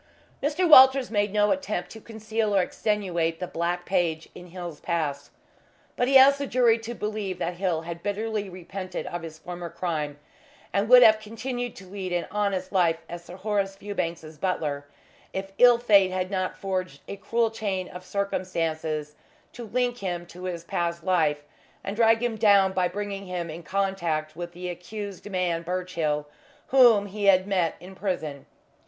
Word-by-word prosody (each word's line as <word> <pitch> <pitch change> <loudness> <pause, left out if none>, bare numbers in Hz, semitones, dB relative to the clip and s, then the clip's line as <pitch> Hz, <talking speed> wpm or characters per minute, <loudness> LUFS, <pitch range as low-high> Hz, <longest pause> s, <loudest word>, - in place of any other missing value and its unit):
Mr. 305 +6 +1
Walters 265 -4 +8
made 205 -2 +1
no 210 0 +3
attempt 215 -11 -2
to 220 - -10
conceal 220 -1 -2
or 195 - +5
extenuate 175 -6 -1
the 180 - -2
black 175 +1 -2
page 170 -4 0
in 180 - -11
Hill's 175 -3 -7
past, 150 -5 -2 0.7
but 245 - +1
he 270 0 +7
asked 275 +1 +7
the 280 - -2
jury 240 -3 +3
to 230 +1 -6
believe 210 -4 -3
that 175 +1 -3
Hill 180 -4 0
had 170 0 -7
bitterly 210 +1 -2
repented 185 +1 -6
of 175 - -5
his 160 -1 -8
former 175 +1 -7
crime, 160 -4 -3 0.6
and 200 +3 +1
would 250 0 +9
have 215 -2 +7
continued 245 +3 -5
to 195 - -11
lead 190 -1 -5
an 175 -1 0
honest 200 -3 -1
life 175 -4 +3
as 175 0 -8
Sir 175 - -11
Horace 195 -1 -1
Fewbanks's 170 -6 -5
butler, 150 -6 -2 0.5
if 195 0 -4
ill 245 -1 +8
fate 205 -5 +5
had 185 0 -2
not 185 -1 -2
forged 185 -2 -3
a - - -5
cruel 230 +3 0
chain 195 -5 -3
of 180 0 -10
circumstances 165 -6 -2 0.4
to 240 -2 -8
link 245 +2 0
him 175 -3 -3
to 180 +1 -10
his 175 -2 -4
past 170 0 -2
life 155 -5 +1 0.4
and 200 - -4
drag 225 +1 +4
him 235 -2 -1
down 200 -3 +5
by 185 -1 +2
bringing 200 +1 -5
him 175 -2 -4
in 165 +2 -8
contact 170 -5 -1
with 175 +1 -6
the 180 +1 -6
accused 200 +3 -7
man 180 -3 0
Birchill, 170 -4 -2 0.4
whom 240 -6 +6
he 205 +1 -4
had 185 -1 +5
met 185 -5 0
in 185 +2 -11
prison. 160 -8 -4
185 Hz, 170 wpm, -26 LUFS, 170-210 Hz, 0.7 s, would